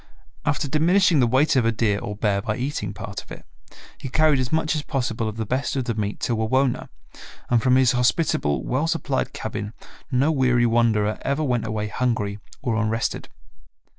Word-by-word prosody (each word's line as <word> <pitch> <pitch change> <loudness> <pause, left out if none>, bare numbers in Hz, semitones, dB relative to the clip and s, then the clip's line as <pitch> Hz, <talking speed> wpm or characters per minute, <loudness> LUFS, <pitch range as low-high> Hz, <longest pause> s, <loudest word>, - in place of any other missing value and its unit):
After - - 0
diminishing 165 +3 +3
the 125 - +4
weight 135 +6 +3
of 130 - +4
a 115 - +2
deer 110 -3 0
or 105 - -5
bear 100 -2 0
by 105 0 -2
eating 125 -6 -3
part 105 0 -6
of - - -20
it, - - -10 0.5
he 135 - -6
carried 155 0 +3
as 130 -1 -2
much 160 -1 +1
as 155 - -1
possible 120 -6 -2
of 110 - -8
the 110 - -2
best 130 +7 -1
of 130 -2 -1
the 120 - -1
meat 105 -1 -3
to 120 - 0
Wawona, 125 +4 0 0.6
and 120 -2 +4
from 130 0 +3
his 130 -2 +5
hospitable 125 - +1
well 140 +6 0
supplied 165 -5 -1
cabin 105 +1 -5 0.4
no 135 +5 +3
weary 125 -4 +3
wanderer 115 -2 +2
ever 140 +3 -1
went 125 -5 0
away 110 -1 -2
hungry 105 -3 -1 0.2
or 115 -5 0
unrested. 115 0 -1
120 Hz, 190 wpm, -23 LUFS, 110-135 Hz, 0.6 s, his